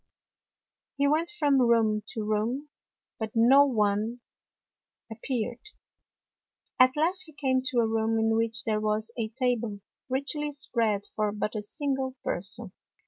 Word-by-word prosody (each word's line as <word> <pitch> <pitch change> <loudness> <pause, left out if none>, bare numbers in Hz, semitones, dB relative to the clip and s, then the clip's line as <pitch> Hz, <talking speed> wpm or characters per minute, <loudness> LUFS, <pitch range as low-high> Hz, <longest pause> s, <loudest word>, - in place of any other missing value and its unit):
He 280 0 +3
went 315 +4 +2
from 290 -10 +2
room 225 -3 +3
to 220 - -4
room, 230 +7 -1 0.5
but 220 -1 -4
no 260 +5 +7
one 215 0 0 0.9
appeared. 235 +1 -3 1.2
At 255 +1 +6
last 360 +4 +1
he 315 - -14
came 260 -3 +1
to 245 -2 +2
a 225 - +1
room 225 0 +1
in 225 0 +2
which 225 -2 +1
there 215 -1 0
was 215 +1 -1
a 230 -2 -2
table 235 -3 -1 0.3
richly 280 +3 -1
spread 230 -7 -1
for 210 -1 0
but 210 0 -3
a 215 - -3
single 265 +3 -3
person. 200 +3 -4
235 Hz, 140 wpm, -28 LUFS, 215-270 Hz, 1.2 s, no